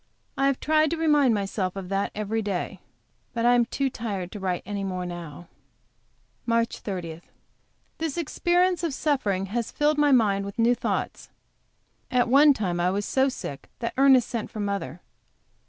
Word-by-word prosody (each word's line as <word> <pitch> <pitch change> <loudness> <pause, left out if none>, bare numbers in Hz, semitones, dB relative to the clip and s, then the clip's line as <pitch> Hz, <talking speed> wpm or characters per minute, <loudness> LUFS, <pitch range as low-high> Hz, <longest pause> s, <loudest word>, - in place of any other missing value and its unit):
I 275 - +2
have 275 -2 +1
tried 310 0 +3
to 335 - -2
remind 295 -7 +3
myself 195 -2 -2
of 190 -2 -6
that 195 0 0
every 215 +1 -1
day. 200 -4 -3 0.6
But 230 0 0
I 245 - +6
am 240 -1 +4
too 275 +3 -1
tired 205 -8 -4
to 210 - -7
write 185 -2 -2
any 200 0 -4
more 185 -2 -3
now. 175 -2 -8 1.0
MARCH 230 0 +1
30. 170 -5 -5 0.8
This 320 -2 -2
experience 350 +2 +1
of 320 -5 -1
suffering 215 -12 0
has 235 -1 -1
filled 295 0 +1
my 295 -1 +4
mind 205 -6 +3
with 200 0 -8
new 235 +1 +4
thoughts. - - -3 0.8
At 245 -1 +2
one 285 +4 +7
time 180 -6 -2
I 175 +1 +2
was 200 +2 -1
so 265 +1 +2
sick 140 - -7
that 235 - -3
Ernest 265 -3 +5
sent 230 -3 -4
for 215 - -8
mother. 200 -4 -3
230 Hz, 170 wpm, -25 LUFS, 195-275 Hz, 1.0 s, one